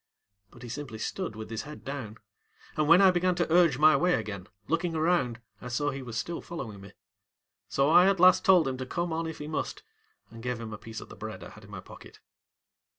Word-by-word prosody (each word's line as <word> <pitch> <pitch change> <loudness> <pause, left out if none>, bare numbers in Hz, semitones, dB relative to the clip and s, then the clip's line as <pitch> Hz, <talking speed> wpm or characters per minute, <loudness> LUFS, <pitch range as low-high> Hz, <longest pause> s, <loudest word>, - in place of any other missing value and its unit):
ŌĆØ 100 0 -53
But 120 - -14
he 120 - -8
simply 135 -3 -6
stood 140 - -4
with 110 0 -8
his 110 - -3
head 150 +1 -11
down, 130 -6 -6 0.6
and 155 -1 +1
when 170 +5 +7
I 190 - +7
began 180 0 +1
to 175 -2 0
urge 170 -6 +5
my 155 +1 +6
way 175 +6 +3
again, 100 -3 -5 0.2
looking 165 +2 -1
around, 155 -8 +1 0.2
I 125 - -7
saw 145 +4 -1
he 135 0 -6
was 120 -3 -6
still 170 - -3
following 120 -12 -7
me. 100 0 -13 0.8
So 135 +8 +2
I 180 +3 +7
at 195 -2 +1
last 185 0 +6
told 185 -8 +5
him 130 -1 -2
to 130 - -5
come 170 +2 -2
on 165 0 -2
if 160 - -6
he 150 - -7
must 155 - -4 0.5
and 115 0 -11
gave 125 0 -3
him 110 -2 -7
a - - -6
piece 110 -1 -8
of - - -12
the - - -11
bread - - -7
I - - -9
had - - -14
in - - -16
my - - -8
pocket. - - -14
145 Hz, 240 wpm, -28 LUFS, 115-170 Hz, 0.8 s, when